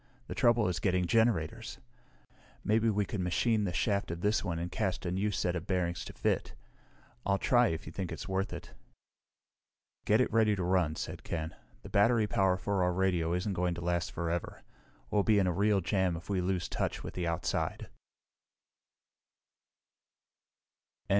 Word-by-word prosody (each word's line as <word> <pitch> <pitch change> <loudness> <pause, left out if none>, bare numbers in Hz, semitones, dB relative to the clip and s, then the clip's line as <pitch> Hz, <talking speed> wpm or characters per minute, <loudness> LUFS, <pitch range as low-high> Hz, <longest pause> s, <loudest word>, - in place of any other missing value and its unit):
The - - -6
trouble 120 -2 +3
is 90 -1 -1
getting 90 0 +1
generators. 110 -6 +1 0.9
Maybe 110 +2 +3
we 105 -1 +1
could 105 - -4
machine 105 +5 +1
the 90 - -1
shaft 100 +3 0
of 85 +1 -5
this 105 +3 +2
one 85 -4 -2
and 85 +1 -4
cast 95 -3 -2
a 85 - -1
new 95 +3 0
set 90 -3 -1
of 85 +1 -4
bearings 90 -2 -1
to - - -8
fit. - - -1 0.7
I'll 100 0 +2
try 120 +3 +4
if 80 -5 -3
you 80 - -7
think 95 0 -4
it's - - -6
worth 95 0 -1
it." - - -8 1.3
"Get 105 +2 +4
it 125 - +1
ready 110 -2 +4
to 95 - -2
run," 90 -4 +2
said - - -6
Ken. 80 -2 -4 0.3
"The - - -9
battery 110 +2 +4
power 95 -3 +2
for 100 0 -1
our 90 - +2
radio 90 -3 +1
isn't 95 +3 -1
going 90 -1 0
to 85 - -6
last 85 -1 -1
forever. 85 0 -3 0.5
We'll 105 - +3
be 105 +1 +3
in 100 - +4
a 90 - +1
real 100 +2 +2
jam 90 +1 +1
if 85 - -8
we 95 -2 +1
lose 90 -1 -1
touch - - -2
with - - -6
the 90 -2 -2
outside." 85 0 -2
95 Hz, 175 wpm, -31 LUFS, 85-105 Hz, 1.3 s, try